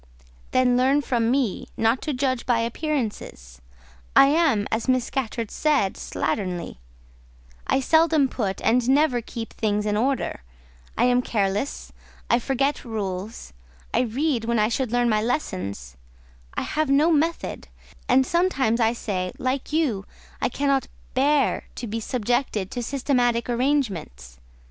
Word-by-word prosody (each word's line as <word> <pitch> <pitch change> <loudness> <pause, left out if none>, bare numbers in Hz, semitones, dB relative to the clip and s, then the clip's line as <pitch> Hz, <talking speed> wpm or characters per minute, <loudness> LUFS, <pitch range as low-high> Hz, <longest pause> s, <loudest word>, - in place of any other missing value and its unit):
"Then 255 -1 +3
learn 270 +3 +3
from 235 -4 +1
me, 255 -5 0
not 225 +3 +2
to 305 - -2
judge 255 -2 -1
by 235 -2 +3
appearances: 230 - -4 0.5
I 275 - +8
am, 285 -10 +2
as 225 +3 -1
Miss 255 -2 +2
Scatcherd 230 -4 -3
said, 285 -11 +1
slatternly; 180 - -3 0.9
I 270 - +2
seldom 320 0 +4
put, 200 -7 -3
and 245 +1 +2
never 275 -3 +3
keep, 225 -1 -7
things 210 -1 -1
in 210 -1 0
order; 255 - -1 0.6
I - - +3
am 250 0 +4
careless; 205 +2 -2 0.4
I 235 - +5
forget 275 +3 0
rules; 200 - -5 0.4
I - - +3
read 255 0 0
when 235 0 +1
I 215 0 +3
should 245 0 -1
learn 245 0 +2
my 215 -2 +2
lessons; 100 - -3 0.6
I - - -1
have 310 -2 -1
no 295 +5 +4
method; 325 +2 -1 0.4
and 260 +1 +5
sometimes 275 -9 +1
I 225 0 +3
say, 185 -6 -3
like 260 +2 -2
you, 270 -12 0 0.3
I - - +1
cannot 275 +1 0 0.3
bear 280 +1 +2
to 245 - -5
be 225 +1 -3
subjected 225 -4 -1
to 245 - -3
systematic 245 -2 0
arrangements. 195 - -1
245 Hz, 140 wpm, -24 LUFS, 215-275 Hz, 0.9 s, I